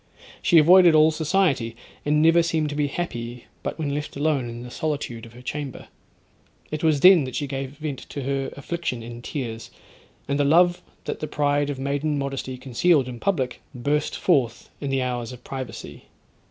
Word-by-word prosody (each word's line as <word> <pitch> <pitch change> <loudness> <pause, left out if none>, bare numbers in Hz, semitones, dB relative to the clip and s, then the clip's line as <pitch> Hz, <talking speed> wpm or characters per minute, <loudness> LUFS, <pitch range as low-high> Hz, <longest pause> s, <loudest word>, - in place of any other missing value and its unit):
She 170 - +4
avoided 175 +1 +7
all 155 +1 +6
society, 155 -8 +1 0.3
and 150 +1 +3
never 165 +1 +6
seemed 160 -2 0
to 145 - -4
be 145 -1 +1
happy 120 -7 -5 0.2
but - - -4
when 145 -3 -2
left 150 +1 -4
alone 145 -4 0
in 120 +1 -7
the 125 - -9
solitude 120 -4 -3
of 115 - -16
her 125 +1 -13
chamber. 140 0 -5 0.8
It 155 +1 -4
was 155 -3 +3
then 180 -3 +8
that 130 - -6
she 145 - -1
gave 135 0 -5
vent 150 -3 -4
to 140 - -5
her 135 0 -1
affliction 140 -5 -3
in 120 +1 -8
tears; 115 -5 -5 0.6
and 140 +1 0
the - - +4
love 175 +5 +4 0.2
that - - -3
the 155 - -3
pride 145 -1 +1
of 145 - -3
maiden 145 +2 -1
modesty 135 -2 -3
concealed 135 +3 +2
in 120 -2 -7
public, 130 -10 -1
burst 145 +4 0
forth 120 -4 +1
in 140 - -2
the 135 -1 +1
hours 125 -1 -3
of 125 - -11
privacy. 130 -2 -7
140 Hz, 185 wpm, -24 LUFS, 125-155 Hz, 0.8 s, then